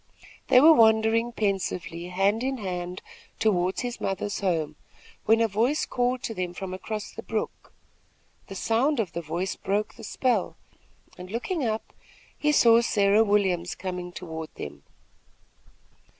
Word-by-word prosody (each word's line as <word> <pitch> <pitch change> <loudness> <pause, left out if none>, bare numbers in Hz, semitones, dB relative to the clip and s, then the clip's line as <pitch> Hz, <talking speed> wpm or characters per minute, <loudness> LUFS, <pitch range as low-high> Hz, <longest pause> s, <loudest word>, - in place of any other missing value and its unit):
They 255 -1 +7
were 320 +4 +8
wandering 225 -1 +4
pensively 185 -5 -2
hand 195 +5 +1
in 265 +1 -1
hand 180 -3 -5 0.3
toward 185 -3 +1
his 245 -1 -5
mother's 195 +1 -2
home, 160 -6 -1 0.5
when 225 +1 +4
a 230 - +4
voice 230 +9 +1
called 245 0 -1
to 225 - -3
them 180 -3 -4
from 190 -1 -5
across 210 +3 -5
the - - -8
brook. - - -4 0.8
The 195 - -8
sound 240 +8 +1
of 210 -5 -1
the 170 - -3
voice 170 +4 -3
broke 205 +2 -2
the 230 - -13
spell, 250 +3 0 0.6
and, 180 0 -8
looking 265 - -2
up, 220 -1 -3 0.4
he 300 - +1
saw 235 -5 +6
Sarah 205 -1 +3
Williams 190 -5 +1
coming 180 -1 -5
toward 160 -3 -7
them. 75 0 -8
205 Hz, 145 wpm, -26 LUFS, 180-230 Hz, 0.8 s, were